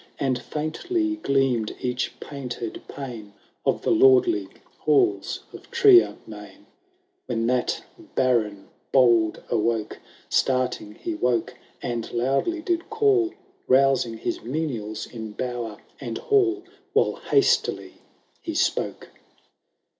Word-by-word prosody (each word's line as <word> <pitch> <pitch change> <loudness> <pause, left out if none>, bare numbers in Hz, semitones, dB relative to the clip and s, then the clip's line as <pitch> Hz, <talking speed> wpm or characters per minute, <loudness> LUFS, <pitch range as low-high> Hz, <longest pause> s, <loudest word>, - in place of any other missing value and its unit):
And 130 -3 0
fieuntly 320 - -2
gleamM 135 - +1
each 125 0 -2
painted 125 -5 -6
pane 115 -7 -8 0.3
Of - - +1
the - - +1
lordly 375 0 +5 0.3
halls 385 -1 +2
of - - -12
Triennain, 380 -4 +3 0.6
When 115 -1 -1
that 125 +1 0 0.3
Baron 110 -6 +1 0.2
bold 120 -5 +4
awoke. 110 -1 0 0.3
Starting 125 -5 0
he 170 - -4
woke, 125 -7 0 0.3
and 120 -2 -3
loudly 135 - 0
did 345 -1 -1
call. 405 -5 +2 0.3
Bousing 130 -3 +3
his - - -3
menials 115 -5 -3
in 110 -3 -8
bower 120 -3 -4 0.2
and 120 -4 -4
hall. 385 -3 +2 0.3
While 450 - +2
hastily 410 - +2 0.4
he 330 - -5
spoke. - - -1
130 Hz, 105 wpm, -25 LUFS, -, 0.6 s, lordly